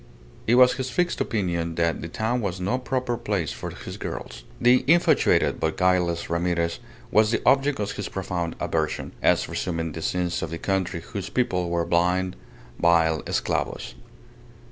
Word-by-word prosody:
It 120 - +5
was 125 0 +7
his 130 -1 -3
fixed 175 +6 0
opinion 85 -6 -1
that 85 0 0
the - - -5
town 110 +7 -1
was 95 -3 -3
no 100 +8 0
proper 125 -1 -2
place 100 -8 -2
for - - -6
his - - -8
girls. - - -6 0.2
The 125 +2 +5
infatuated 170 +3 +4
but 80 0 -1
guileless 90 -2 +2
Ramirez 85 0 0 0.3
was 110 0 +4
the 115 - 0
object 140 0 +3
of 105 -1 -1
his 100 -2 -5
profound 90 -3 -3
aversion, 80 -3 -2
as - - +3
resuming 85 -2 -2
the 80 - -6
sins 90 0 -1
of 80 - -3
the 85 - -4
country 95 -2 -1
whose 95 +2 -6
people 90 -9 0
were 85 -1 0
blind, 90 +2 +1 0.4
vile 80 -2 +3
esclavos. - - -2
90 Hz, 165 wpm, -25 LUFS, 85-115 Hz, 0.4 s, was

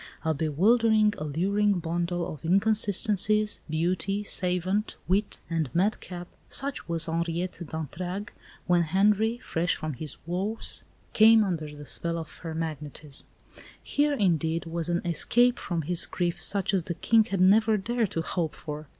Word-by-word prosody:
A 160 - +2
bewildering, 210 +8 +3
alluring 195 +8 +1
bundle 170 +1 -2
of 150 - -12
inconsistencies 210 +2 +2
beauty, 185 +5 0
savant, 185 +2 0
wit, 200 +3 0
and 165 -4 -1
madcap 180 -2 -1 0.2
such 275 -8 -3
was 165 -1 +3
Henriette 170 +2 -2
d'Entragues 175 +6 -5 0.3
when 175 -1 +3
Henri, 205 +7 +2
fresh 175 -7 -1
from 155 -1 -4
his 150 +2 -4
woes, 190 +6 -2 0.3
came 220 0 +7
under 155 -6 -3
the 145 0 -10
spell 170 +7 0
of 160 -2 -8
her 165 -2 -6
magnetism. 150 -3 -5 0.6
Here, 290 +1 +1
indeed, 165 - +1
was 165 0 -3
an 175 0 0
escape 240 +9 +3
from 170 -4 -3
his 175 +3 +1
grief 175 -1 -2
such 200 +1 +1
as 185 -4 +1
the 170 - -3
King 225 +4 +3
had 195 -4 -3
never 215 +4 +5
dared 230 +1 -1
to 165 - -2
hope 165 -2 -2
for. 150 0 -7
175 Hz, 145 wpm, -27 LUFS, 165-210 Hz, 0.6 s, came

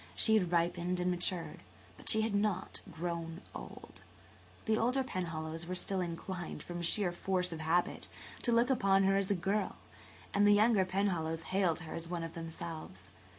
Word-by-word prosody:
She 220 - +4
had 180 -5 +2
ripened 175 +1 +1
and 180 0 +1
matured 175 0 0 0.4
but - - -3
she 220 - +4
had 220 -1 0
not 205 -2 0
grown 170 0 -4
old. - - -10 0.6
The 220 -2 +3
older 250 +4 +2
Penhallows 165 -6 -4
were 185 - -2
still 190 +1 -1
inclined, 175 +1 -5
from 175 0 -5
sheer 180 +2 +1
force 180 0 -1
of 165 - -5
habit, 165 +3 +1 0.3
to 240 - +1
look 235 +3 +4
upon 195 -6 +4
her 195 0 +4
as 195 -1 +1
a 200 - +3
girl, 195 +4 0 0.6
and 205 +1 +5
the 205 - +7
younger 210 -2 +5
Penhallows 175 -4 0
hailed 180 -4 +2
her 160 - -7
as 165 0 -3
one 175 -1 -2
of 165 0 -5
themselves. 160 - -7
180 Hz, 175 wpm, -34 LUFS, 165-200 Hz, 0.6 s, the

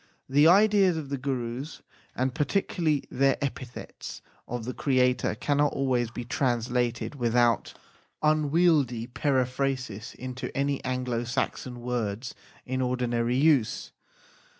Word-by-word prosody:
The 145 +3 +5
ideas 195 -1 +5
of 150 -4 -5
the 140 - -2
Gurus 130 +1 -4 0.3
and 130 0 0
particularly 155 -1 0
their 135 +1 +3
epithets 130 -3 -6 0.2
of 120 -2 -4
the 125 - -3
Creator 125 -2 +1
cannot 145 0 +1
always 125 -4 +1
be 120 +1 -6
translated 120 0 0
without 120 -3 +2
PREFACE - - -12 0.5
xxxi 155 - +6
unwieldy 150 -6 +2
periphrasis 130 -3 -1
into 130 +1 -6
any 140 0 0
Anglo 125 -2 -1
Saxon 125 0 -3
words 120 -1 -3 0.3
in 130 +1 -2
ordinary 125 -1 0
use. 140 -6 +2
130 Hz, 120 wpm, -27 LUFS, 120-140 Hz, 0.5 s, xxxi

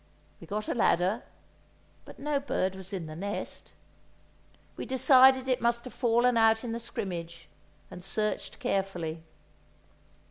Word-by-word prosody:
We - - -12
got 210 +1 -3
a - - 0
ladder, 200 -1 +2 0.8
but - - -12
no 290 0 -1
bird 190 -9 -1
was 190 0 -9
in 185 -4 -4
the 155 0 -8
nest! 200 +5 -5 1.0
We - - -5
decided 260 0 +5
it 255 -1 +1
must 235 +1 +1
have 255 - -8
fallen 240 +1 +2
out 225 0 +4
in 240 - -4
the 230 - -3
scrimmage, 170 -7 -6 0.4
and 180 - -9
searched 210 +3 -2
carefully. 175 -5 -2
220 Hz, 140 wpm, -29 LUFS, 185-245 Hz, 1.0 s, decided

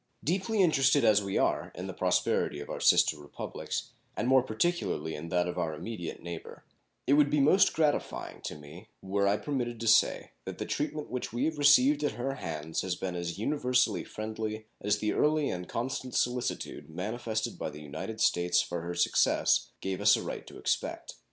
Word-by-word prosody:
Deeply 195 +5 +1
interested 135 -5 +4
as 105 -1 +5
we 100 -1 -2
are - - +1
in - - -5
the - - -5
prosperity 75 - +1
of 75 - -7
our - - -4
sister 75 - +4
Republics, 75 0 -5 0.3
and 120 - -1
more 130 0 +6
particularly 110 - -1
in 80 +3 -6
that 90 0 +1
of 90 - -3
our 80 -3 -1
immediate 90 +1 -6
neighbor, 85 -1 -8 0.4
it 140 - +3
would 145 0 +5
be 150 - +2
most 155 +8 +5
gratifying 155 -2 -1
to - - -5
me 75 +8 -12 0.2
were 100 +1 +1
I 100 +1 +3
permitted 120 -4 -3
to 115 - -3
say 110 - +3
that - - -6
the - - -4
treatment 150 0 -3
which 125 -1 -3
we 120 +2 -1
have 160 -2 -2
received 145 0 +5
at 145 - 0
her 135 +3 -3
hands 80 - -4
has 95 -2 -2
been 90 0 -4
as 85 0 -4
universally 125 +2 +1
friendly 110 0 -5 0.2
as 105 +1 +1
the 105 +1 -1
early 150 -1 +2
and 90 0 -5
constant 130 +1 -3
solicitude 125 -7 -2
manifested 110 +6 -3
by - - -2
the 75 - -10
United 80 +10 -6
States 90 0 +3
for 85 -1 -2
her 85 +1 -5
success - - +3
gave 95 -1 -3
us - - +6
a - - -3
right - - -6
to - - -11
expect. - - -2
110 Hz, 190 wpm, -30 LUFS, 90-135 Hz, 0.4 s, more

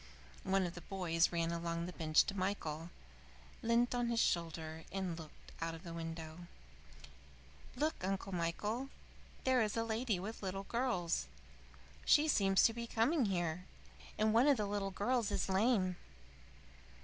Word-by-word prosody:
One 195 0 +2
of 175 - -4
the 175 - -8
boys 170 -2 +1
ran 170 -1 0
along 170 0 -2
the 180 - -6
bench 155 -3 +4
to - - -4
Michael, 175 -4 -2 0.7
leant 235 0 +2
on 245 -1 +1
his 235 -1 +1
shoulder, 160 -4 -1
and 190 -3 -2
looked 160 -2 -12
out 165 0 -2
of 165 - -11
the 170 - -7
window. 165 0 -6 1.3
"Look, 305 - -1
Uncle 195 +1 -2
Michael! 205 +9 -1 0.5
There 260 -1 +4
is 215 0 0
a 225 - +2
lady 225 -3 0
with 210 +5 -6
little 195 0 -3
girls! 225 -7 0 0.8
She 300 +1 +5
seems 195 -9 +4
to 225 - +5
be 235 0 -5
coming 240 +5 +2
here. 175 -2 -1 0.5
And 215 0 +3
one 235 +5 +5
of 285 -3 +5
the 205 -2 -1
girls 225 +3 0
is - - 0
lame." 190 -2 +2
195 Hz, 150 wpm, -36 LUFS, 170-230 Hz, 1.3 s, She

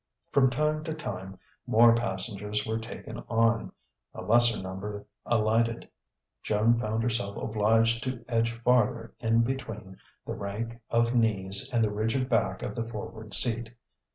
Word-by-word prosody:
From 130 -2 +5
time 150 +4 0
to 160 - -3
time 95 -10 -6 0.3
more 115 +1 +6
passengers 105 -3 -1
were 110 0 -1
taken 115 0 -8
on; 115 0 +2 0.4
a - - -6
lesser 120 0 +4
number 95 +2 -6 0.2
alighted: 115 +1 +1 0.5
Joan 110 +3 +2
found 110 0 -1
herself 115 -4 -1
obliged 115 +2 +2
to 130 -2 -4
edge 115 -1 +1
farther 115 -2 +2
in 115 0 +3
between 110 -7 -5 0.3
the - - -4
rank 115 +4 -5
of 115 +1 +2
knees 105 -1 +1
and 120 -2 +2
the 105 - +1
rigid 115 +5 -1
back 105 -6 +1
of - - -3
the 115 -2 -3
forward 110 -1 -5
seat. 115 -1 0
115 Hz, 145 wpm, -28 LUFS, 105-120 Hz, 0.5 s, more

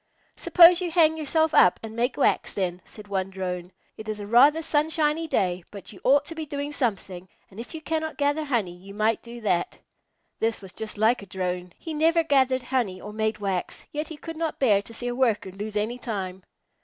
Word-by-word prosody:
"Suppose 350 0 +7
you 355 - -1
hang 320 -2 +4
yourself 315 +1 +1
up 180 - +5
and 220 0 -7
make 245 +2 -1
wax - - +1
then," 180 -2 -2
said 210 -1 -12
one 195 -1 -2
Drone. 180 -2 -5 0.3
"It 220 0 -8
is 215 -1 -4
a 205 - -6
rather 280 +9 +5
sunshiny 310 +1 +1
day, 180 - 0
but 200 0 -10
you 190 - -15
ought 280 +2 +4
to 330 - -7
be 320 -1 -5
doing 285 0 -5
something, 190 -8 -3 0.2
and 195 - -12
if 240 +7 -8
you 320 - -6
cannot 315 0 -2
gather 290 +2 +1
honey 220 -11 -1
you 195 +3 -13
might 215 +1 +1
do 235 0 -10
that." 180 -5 0 0.6
This 225 0 0
was 190 -2 -11
just 220 -1 -7
like 220 +3 +3
a 200 - -11
Drone. 180 -1 -4
He 325 - -7
never 330 +2 +3
gathered 265 -4 +2
honey 245 -8 -1
or 210 +2 -9
made 220 0 -1
wax, 195 -3 -3
yet 300 +1 -3
he 320 - -8
could 325 +1 -8
not 325 -1 -2
bear 210 -7 +3
to 205 - -12
see 245 +2 -5
a 245 - -1
Worker 230 -6 0
lose 205 +3 -6
any 225 +4 -2
time. 190 -6 -5
230 Hz, 215 wpm, -25 LUFS, 195-300 Hz, 0.6 s, Suppose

